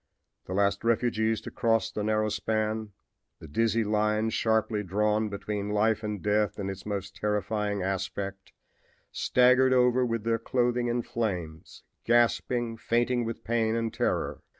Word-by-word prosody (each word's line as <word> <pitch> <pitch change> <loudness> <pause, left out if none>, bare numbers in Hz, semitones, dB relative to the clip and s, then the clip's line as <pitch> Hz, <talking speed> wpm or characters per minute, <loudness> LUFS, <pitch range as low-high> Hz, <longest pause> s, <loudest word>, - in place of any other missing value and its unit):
The 90 - -4
last 100 0 +1
refugees 115 -1 +1
to - - -8
cross 115 -1 +1
the 105 - -3
narrow 110 0 +1
span, 110 +1 -2 0.5
the 80 - -12
dizzy 115 +7 +1
line 105 +1 +1
sharply 110 -1 +1
drawn 105 +2 0
between 100 0 -4
life 105 +1 +2
and 105 -4 -4
death 105 0 +1
in 95 -2 -3
its 95 +1 -9
most 100 -2 -4
terrifying 105 -1 -1
aspect, 95 +1 -4 0.6
staggered 125 +1 +4
over 125 0 +4
with 115 -3 -1
their 115 0 +1
clothing 120 +1 0
in 120 0 0
flames, 90 -9 -4 0.2
gasping, 120 0 +1
fainting 120 +1 0
with 115 0 -5
pain 115 0 +1
and 115 -1 -2
terror. - - -1
110 Hz, 145 wpm, -28 LUFS, 105-115 Hz, 0.6 s, staggered